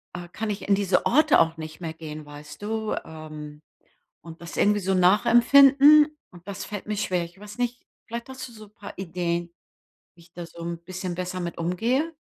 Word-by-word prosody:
äh, 175 -1 -7
kann 220 +3 -4
ich 200 - -6
in 200 - +6
diese 195 -2 +1
Orte 305 +4 +4
auch 165 0 +2
nicht 155 0 -8
mehr 160 -1 -4
gehen, 155 -2 -8
weißt 145 +3 -12
du? 220 +1 -2
Ähm, 155 -1 -10 0.6
und 165 0 -12
das 170 - -8
irgendwie 205 0 +3
so 190 +1 0
nachempfinden, 275 - +6 0.2
und 175 +1 -16
das 200 - -6
fällt 205 -2 -7
mir 210 -1 -2
schwer. 180 -4 0
Ich 175 +3 -16
weiß 210 +1 -11
nicht, 245 0 -2 0.2
vielleicht 235 +3 -6
hast 260 0 -7
du - - -15
so 215 -1 -12
'n 210 - -23
paar 200 - -10
Ideen, 170 -2 -3 0.6
wie 170 - -19
ich 170 - -23
da 175 -1 -7
so 170 0 -13
'n 170 0 -4
bisschen 185 -1 -5
besser 180 +1 -4
mit 170 -1 -5
umgehe? 235 - -1
185 Hz, 205 wpm, -25 LUFS, 170-220 Hz, 0.6 s, in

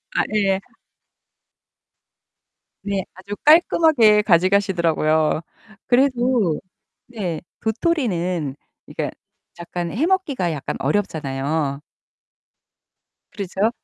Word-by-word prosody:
아 - - +3
예. 195 -2 +2 2.2
네. 200 -2 -2
아주 195 +2 -7
깔끔하게 300 -9 +5
가져가시더라고요. 170 -5 +2 0.5
그래도 245 - +2 0.5
네 195 -9 -4 0.2
도토리는 185 - -1 0.3
그니까 - - -4 0.5
약간 170 0 -4
해 270 +9 0
먹기가 305 - 0
약간 145 -4 -4
어렵잖아요. 145 -4 -1 1.5
그렇죠. 200 +2 -1
195 Hz, 190 characters per minute, -21 LUFS, 165-235 Hz, 2.2 s, 깔끔하게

